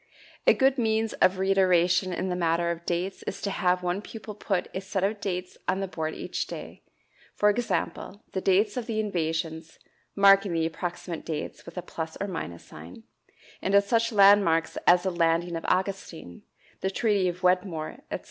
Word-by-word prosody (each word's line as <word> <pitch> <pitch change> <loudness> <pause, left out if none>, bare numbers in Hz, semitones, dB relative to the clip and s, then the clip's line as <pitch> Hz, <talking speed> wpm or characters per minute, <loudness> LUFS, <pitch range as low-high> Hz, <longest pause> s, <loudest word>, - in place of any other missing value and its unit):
A - - +7
good 265 0 +3
means 220 -1 +1
of 185 +1 +4
reiteration 185 -1 +3
in 185 +1 -2
the 180 - -1
matter 170 0 +1
of 170 0 -7
dates 180 +2 -2
is 195 - -4
to 200 - -1
have 180 -1 +1
one 180 +2 -1
pupil 215 0 -9
put 195 -3 -2
a 190 - -3
set 190 0 -3
of 205 +1 -1
dates 180 -2 -4
on 190 - +1
the 195 - -2
board 160 -3 -4
each - - -4
day - - -8 0.5
for 210 0 +4
example, 220 -2 -3
the 190 - -2
dates 200 +4 +2
of 245 -2 -3
the 220 -2 -2
invasions 160 -5 -3 0.4
(marking 195 -1 +5
the 165 -1 +1
approximate 170 +1 -5
dates 155 0 -5
with 170 - -11
a 180 - -3
plus 160 -1 -6
or 200 - -2
minus 85 - -6
sign), 85 +8 -12 0.6
and 195 - +1
of 200 - +6
such 230 +3 +1
landmarks 195 -6 +5
as 175 0 +6
the 190 - 0
Landing 170 0 +1
of 165 - -5
Augustine, 185 - -2 0.4
the 190 - -1
Treaty 200 -2 +1
of 180 +1 -4
Wedmore, 180 -3 0
etc. - - -3
185 Hz, 185 wpm, -27 LUFS, 170-200 Hz, 0.6 s, A